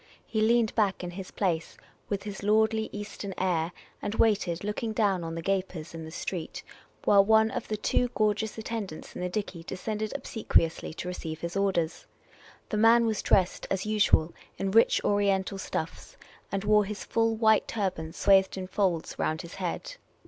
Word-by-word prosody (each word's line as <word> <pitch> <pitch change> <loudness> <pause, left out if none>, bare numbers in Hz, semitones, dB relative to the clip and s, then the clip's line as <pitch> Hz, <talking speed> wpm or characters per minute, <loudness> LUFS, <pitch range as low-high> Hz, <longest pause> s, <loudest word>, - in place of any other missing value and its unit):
He 220 - -1
leaned 230 0 +3
back 200 -4 +1
in 175 - -4
his 185 +1 -7
place 170 -5 -2 0.3
with 200 -1 -2
his 205 -2 -6
lordly 220 +1 +2
Eastern 205 -2 -6
air, 175 -3 0 0.3
and 205 - -3
waited, 200 -6 +2
looking 210 +2 -2
down 200 -5 +1
on 165 0 -4
the 165 - -5
gapers 185 -4 -2
in 165 -1 -7
the - - -8
street, 165 0 -5 0.4
while 200 -1 +7
one 220 +1 +4
of - - -4
the 215 - -2
two 245 +3 +1
gorgeous 215 0 0
attendants 220 -7 -5
in - - -6
the 180 - -1
dickey 185 -3 -4
de 180 - -6
scended 215 +3 -3
obsequiously 220 -10 0
to 180 - -5
''eceive 160 -3 -5
his 170 +1 -4
orders. 185 -4 0 0.6
The 215 - -1
man 230 +2 +6
was 220 -2 0
dressed 185 -2 +2
as 190 0 -1
usual 210 -6 +3 0.2
in 195 0 -1
rich 225 +3 +4
Oriental 200 -1 +1
stuffs, 160 -3 -5 0.3
and 195 0 -1
wore 210 0 +4
his 210 +1 -5
full 225 0 +1
white 220 -1 +4
turban 185 -7 -2
swathed 190 +2 +3
in 185 - -3
folds 185 -3 -1
round 160 +3 -1
his 170 - -10
head. 185 - -4
200 Hz, 180 wpm, -28 LUFS, 180-215 Hz, 0.6 s, while